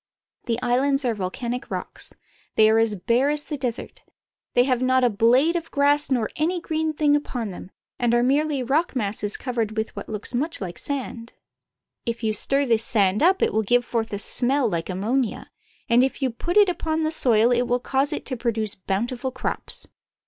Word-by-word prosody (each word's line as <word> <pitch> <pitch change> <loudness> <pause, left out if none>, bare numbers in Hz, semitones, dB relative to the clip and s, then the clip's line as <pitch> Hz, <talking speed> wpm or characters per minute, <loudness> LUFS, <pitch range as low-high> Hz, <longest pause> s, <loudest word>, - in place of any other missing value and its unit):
The 230 0 0
islands 270 +3 +1
are 240 - +1
volcanic 235 +6 -4
rocks. - - -6 0.4
They 220 0 +5
are 220 - +4
as 225 -2 +2
bare 235 +8 +1
as 295 0 0
the 300 - -5
desert. 250 -4 -5 0.5
They 245 - +6
have 255 -1 0
not 255 0 +3
a 245 - +3
blade 250 +10 +3
of 330 -1 -3
grass 285 0 +2
or 235 -4 +1
any 340 +4 0
green 315 -1 -2
thing 295 -1 +3
upon 245 -7 -3
them, 180 - -9 0.3
and 240 -1 +1
are 240 - +3
merely 285 +1 +1
rock 290 +6 0
masses 210 -2 -2
covered 230 -4 -3
with 220 +1 -3
what - - -7
looks 210 +3 -3
much 290 +7 -1
Hke 180 -3 -6
sand. 245 -4 -5 0.7
If 235 -1 -4
you 215 -1 +1
stir 275 +6 +2
this 230 -3 +1
sand 200 -3 +1
up 370 +3 +4
it - - +1
will 220 - +2
give 245 +3 +2
forth 225 -2 -2
a 205 - -2
smell 255 +5 +2
like 170 -4 -3
ammonia, 220 +6 -2 0.4
and 235 +2 +4
if 265 - -1
you 265 -3 0
put 340 - -2
it 415 -1 +7
upon 320 -3 -1
the 310 - 0
soil 235 -6 +4
it 245 0 +1
will 245 +1 +1
cause 270 +3 0
it - - -4
to 260 - -2
produce 225 -3 0
bountiful 235 +8 -3
crops. 255 - -4
245 Hz, 200 wpm, -23 LUFS, 225-280 Hz, 0.7 s, it